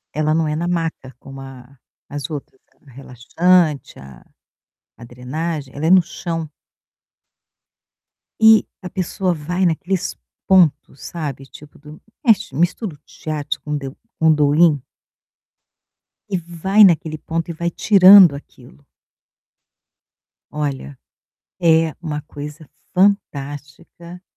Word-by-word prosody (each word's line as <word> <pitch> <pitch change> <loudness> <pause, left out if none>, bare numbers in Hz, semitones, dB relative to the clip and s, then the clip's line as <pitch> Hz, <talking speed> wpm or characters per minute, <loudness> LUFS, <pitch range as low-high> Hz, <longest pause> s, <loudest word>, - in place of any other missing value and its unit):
Ela 155 0 0
não 160 -1 0
é 150 - -2
na 170 +3 -3
maca 165 -6 -4
como 135 0 -11
a 135 0 -13 0.3
as 145 -1 -6
outras, 145 -3 -8 0.2
ela 140 - -21
é - - -19
relaxante, 150 +4 0
a 65 -2 -14 0.8
a 120 - -11
drenagem. 135 +4 -6
Ela 145 +3 -3
é - - +2
no 190 0 +7
chão. 165 -1 -5 1.9
E 220 0 +6 0.2
a 180 - -7
pessoa 185 +1 -2
vai 175 +4 -2
naqueles 180 +2 -2 0.3
pontos, 155 -7 +2
sabe, 145 -5 -6
tipo 145 +2 -16
do 150 +2 -14 0.2
mexe, 210 - +2
mistura 175 - -1
o - - -25
Shiatsu 150 -1 -5
com 150 - -8
o - - 0
de 135 -1 -6 0.3
com 160 - +2
o 155 - +6
Do-in. 150 -1 +3 1.5
E 190 - -1 0.2
vai 200 +4 +5
naquele 160 -3 +1
ponto 165 +2 -4
e - - -4
vai 170 +2 -3
tirando 190 -3 +7
aquilo. 70 - -15 1.7
Olha, 145 -2 -5 0.6
é 160 -2 +3
uma 150 -3 -5
coisa 150 +1 -10 0.3
fantástica 170 -2 -2
155 Hz, 125 wpm, -19 LUFS, 145-175 Hz, 1.9 s, no